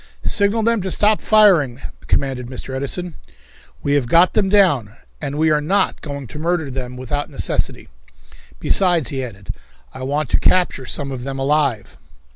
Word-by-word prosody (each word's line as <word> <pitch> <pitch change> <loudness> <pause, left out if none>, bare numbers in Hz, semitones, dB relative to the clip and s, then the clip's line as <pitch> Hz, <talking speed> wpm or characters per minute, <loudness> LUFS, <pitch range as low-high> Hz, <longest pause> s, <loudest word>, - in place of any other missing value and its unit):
"Signal 205 +2 +1
them 230 -1 +2
to 190 - -3
stop 210 +3 +2
firing," 180 - +4 0.3
commanded 130 -3 -1
Mr. 130 +1 -7
Edison. 160 +6 -3 0.7
"We 145 - 0
have 140 -4 +1
got 170 +7 +4
them 200 -3 +1
down, 170 - +3 0.3
and 140 +1 -4
we 160 0 +2
are 150 -1 +2
not 190 +6 0
going 140 -2 -6
to 150 - -9
murder 160 -3 -1
them 125 -1 -6
without 145 +4 -3
necessity." 140 - -2 0.7
"Besides," 175 - +2
he 135 -2 -3
added, 105 -5 -7 0.4
"I 130 - -9
want 145 +2 -2
to - - +3
capture 175 -8 +1
some 140 -1 -4
of 125 -2 -6
them 135 0 -5
alive." 135 -6 0
145 Hz, 165 wpm, -19 LUFS, 130-180 Hz, 0.7 s, firing